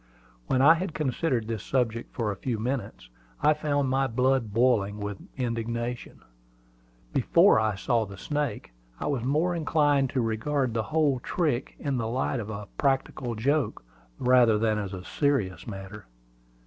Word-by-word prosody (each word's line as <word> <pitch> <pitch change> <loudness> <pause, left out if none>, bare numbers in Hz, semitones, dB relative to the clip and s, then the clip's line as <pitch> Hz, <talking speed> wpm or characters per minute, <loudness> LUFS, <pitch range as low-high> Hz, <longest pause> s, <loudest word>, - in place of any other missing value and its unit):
When 130 0 +2
I 155 +3 +9
had 170 0 -3
considered 130 -4 0
this 115 -3 -3
subject 115 -2 -1
for 110 -4 -2
a - - -4
few 115 +4 -3
minutes, 110 - -4 0.3
I 150 +1 +4
found 145 -2 0
my 135 +1 +1
blood 130 -1 +1
boiling 110 -3 +2
with 105 -1 -5 0.2
indignation. 120 -1 -3 0.9
Before - - +5
I 110 -2 +1
saw 115 +2 0
the 100 0 -10
snake, 145 - -3 0.3
I - - -4
was 140 -5 -1
more 155 +7 +1
inclined 145 -4 +2
to 130 - 0
regard 120 +3 -1
the 115 - 0
whole 150 -5 +2
trick 145 -2 -1
in 140 -3 -2
the 115 -2 -1
light 130 +2 -1
of 110 -1 -5
a 105 -1 -6
practical 135 -3 0
joke, 135 - 0 0.3
rather 125 -3 +4
than 110 0 +1
as 100 -2 -4
a 90 0 -9
serious 135 -12 0
matter. 100 0 -8
125 Hz, 160 wpm, -27 LUFS, 110-140 Hz, 0.9 s, I